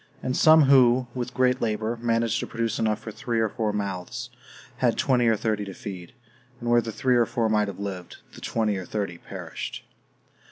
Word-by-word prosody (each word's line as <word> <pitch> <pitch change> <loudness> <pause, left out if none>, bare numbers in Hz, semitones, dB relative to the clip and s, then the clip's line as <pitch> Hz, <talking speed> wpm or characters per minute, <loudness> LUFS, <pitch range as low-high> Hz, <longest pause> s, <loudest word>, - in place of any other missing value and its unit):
And 130 - -1
some 160 -1 +7
who, 130 -2 +5
with 125 -1 -4
great 125 0 +2
labor, 110 0 -1
managed 115 -1 +1
to - - -4
produce 115 -1 -2
enough 110 -1 +1
for 110 - -8
three 120 +1 -2
or 110 -1 +2
four 110 -1 -1
mouths, 100 -3 -4 0.5
had - - +1
twenty 125 -3 +2
or 115 - +4
thirty 105 -1 -1
to 100 -1 -8
feed; 95 -1 -8 0.5
and 120 0 -2
where 120 0 +5
the 115 0 -5
three 125 +3 +1
or 120 - +3
four 115 -2 0
might 105 -1 +2
have 100 - -6
lived, 95 -3 -6 0.2
the - - -12
twenty 110 -3 0
or 95 - -5
thirty 100 -5 -3
perished. - - -7
115 Hz, 200 wpm, -25 LUFS, 105-120 Hz, 0.5 s, some